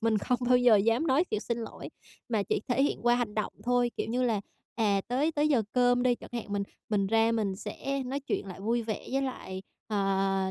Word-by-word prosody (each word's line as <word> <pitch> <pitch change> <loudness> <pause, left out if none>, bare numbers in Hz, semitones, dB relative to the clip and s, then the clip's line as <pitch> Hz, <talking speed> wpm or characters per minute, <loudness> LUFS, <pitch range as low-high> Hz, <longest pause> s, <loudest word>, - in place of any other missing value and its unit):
mình 220 -2 +2
không 250 +4 0
bao 250 0 +6
giờ 245 -3 +6
dám 230 +9 +2
nói 290 +6 +3
chịu 215 - -2
xin 235 -1 -2
lỗi 225 - -7 0.4
mà 220 -4 +1
chỉ - - -1
thể 250 +2 +2
hiện 285 - 0
qua 240 0 +4
hành 240 -4 -1
động 215 - -2
thôi, 245 0 +2
kiểu - - -2
như 250 +1 0
là, 225 -5 +1 0.3
à, 205 -4 +2
tới 280 +6 +1
tới 300 0 +2
giờ 250 -7 +3
cơm 245 0 +3
đi 250 -1 +3
chẳng - - -13
hạn 235 -3 -4
mình 200 0 0 0.3
mình 200 -2 +1
ra 225 +2 +3
mình 205 -4 -1
sẽ 275 +5 -4
nói 275 +2 -2
chuyện 265 -7 -3
lại 190 0 -8
vui 230 +3 0
vẻ 220 -1 -5
với 270 0 +1
lại, 190 -8 -5 0.3
à, 195 -2 +1
230 Hz, 235 wpm, -29 LUFS, 205-250 Hz, 0.4 s, bao